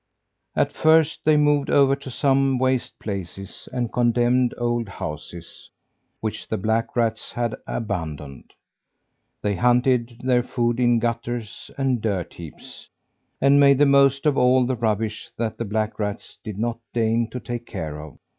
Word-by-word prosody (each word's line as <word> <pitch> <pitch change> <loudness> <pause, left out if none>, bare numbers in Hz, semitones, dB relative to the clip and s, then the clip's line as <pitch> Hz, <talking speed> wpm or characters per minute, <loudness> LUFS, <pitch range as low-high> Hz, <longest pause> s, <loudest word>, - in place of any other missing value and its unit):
At - - +1
first 160 0 +3
they 155 0 +5
moved 145 -1 +2
over 140 -1 +4
to 140 - -10
some 135 +1 +2
waste 130 0 0
places 95 -1 -7
and 125 -3 -3
condemned 120 +1 +2
old 120 -2 -1
houses 85 -1 -8 0.5
which 110 -1 -4
the 110 - -2
black 110 +3 -1
rats 115 -2 -1
had 120 -2 -1
abandoned. 80 - -5 0.9
They 105 -1 0
hunted 125 -1 +2
their 125 -1 +3
food 120 -1 -1
in 120 -1 +4
gutters 115 -1 -3
and 135 -4 0
dirt 100 -5 -2
heaps, 80 -3 -11 0.5
and 140 +1 +5
made 140 -1 +6
the 145 - +5
most 140 0 +4
of 150 -3 +3
all 125 0 +4
the 130 +1 -1
rubbish 110 -2 -2
that 110 -1 -3
the 115 - -2
black 110 +1 -2
rats 105 -1 -4
did 105 -3 -6
not 115 +1 -2 0.2
deign 115 0 +1
to 125 - -5
take 120 -1 -6
care 80 -7 -5
of. 75 -2 -12
120 Hz, 155 wpm, -23 LUFS, 110-130 Hz, 0.9 s, made